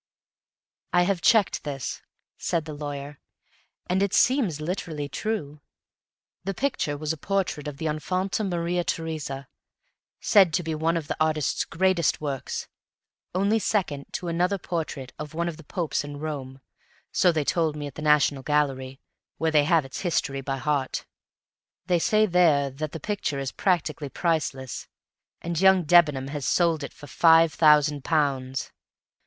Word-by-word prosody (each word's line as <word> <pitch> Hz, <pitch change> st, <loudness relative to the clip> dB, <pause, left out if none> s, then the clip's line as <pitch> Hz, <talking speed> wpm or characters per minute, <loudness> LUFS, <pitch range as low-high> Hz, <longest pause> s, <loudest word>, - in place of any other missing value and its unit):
I 175 Hz, 0 st, +5 dB
have 180 Hz, -1 st, 0 dB
checked 220 Hz, -1 st, +3 dB
this," 140 Hz, -4 st, -4 dB, 0.3 s
said 165 Hz, -3 st, -1 dB
the 155 Hz, -, -6 dB
lawyer, 145 Hz, -1 st, -6 dB, 0.7 s
"and 185 Hz, +2 st, 0 dB
it 200 Hz, -1 st, +1 dB
seems 240 Hz, -, +3 dB
literally 155 Hz, -3 st, -3 dB
true; 150 Hz, -4 st, -4 dB, 0.8 s
the 195 Hz, +1 st, -3 dB
picture 245 Hz, -, -1 dB
was 155 Hz, +1 st, -2 dB
a -, -, -8 dB
portrait 185 Hz, -4 st, -2 dB
of 145 Hz, -2 st, -6 dB
the 160 Hz, -, -5 dB
Infanta 185 Hz, +7 st, -1 dB
Maria 175 Hz, -2 st, -1 dB
Teresa, 155 Hz, -5 st, -4 dB, 0.7 s
said 190 Hz, -6 st, +5 dB
to 175 Hz, -, 0 dB
be 160 Hz, 0 st, -2 dB
one 160 Hz, +2 st, +1 dB
of 155 Hz, -3 st, -4 dB
the -, -, -2 dB
artist's 155 Hz, -3 st, 0 dB
greatest 185 Hz, -2 st, +1 dB
works, 140 Hz, -3 st, -4 dB, 0.9 s
second 190 Hz, -10 st, 0 dB
only -, -, -31 dB
to 180 Hz, -, -4 dB
another 180 Hz, +4 st, +1 dB
portrait 155 Hz, -8 st, -4 dB
of 150 Hz, 0 st, -7 dB
one 170 Hz, +1 st, -1 dB
of 165 Hz, -3 st, -4 dB
the 165 Hz, -, -12 dB
Popes 165 Hz, -1 st, -2 dB
in 145 Hz, 0 st, -7 dB
Rome 140 Hz, -3 st, -6 dB, 0.5 s
so 180 Hz, -, +4 dB
they 155 Hz, -3 st, 0 dB
told 160 Hz, -2 st, +1 dB
me 150 Hz, -1 st, -5 dB
at 140 Hz, -, -7 dB
the 155 Hz, -, -8 dB
National 150 Hz, -2 st, +3 dB
Gallery, 135 Hz, -2 st, -1 dB, 0.4 s
where 160 Hz, 0 st, 0 dB
they 150 Hz, -2 st, +4 dB
had 165 Hz, -2 st, +3 dB
its 135 Hz, -, -7 dB
history 140 Hz, -6 st, -1 dB
by 135 Hz, 0 st, -3 dB
heart. 135 Hz, 0 st, -1 dB, 0.8 s
They 175 Hz, -1 st, +2 dB
say 215 Hz, +5 st, +3 dB
there 165 Hz, -7 st, +3 dB
that 150 Hz, +3 st, -5 dB
the 165 Hz, -, -5 dB
picture 205 Hz, -5 st, -2 dB
is 135 Hz, -1 st, -3 dB
practically 160 Hz, -5 st, 0 dB
priceless. 140 Hz, -6 st, -2 dB, 0.6 s
And 170 Hz, 0 st, -2 dB
young 190 Hz, -1 st, +6 dB
Debenham 150 Hz, -5 st, +4 dB
has 145 Hz, -2 st, -4 dB
sold 165 Hz, -4 st, +2 dB
it -, -, -6 dB
for -, -, -13 dB
five 165 Hz, +1 st, +5 dB
thousand 150 Hz, -3 st, +4 dB
pounds!" 135 Hz, -4 st, 0 dB
155 Hz, 160 wpm, -26 LUFS, 145-175 Hz, 0.9 s, young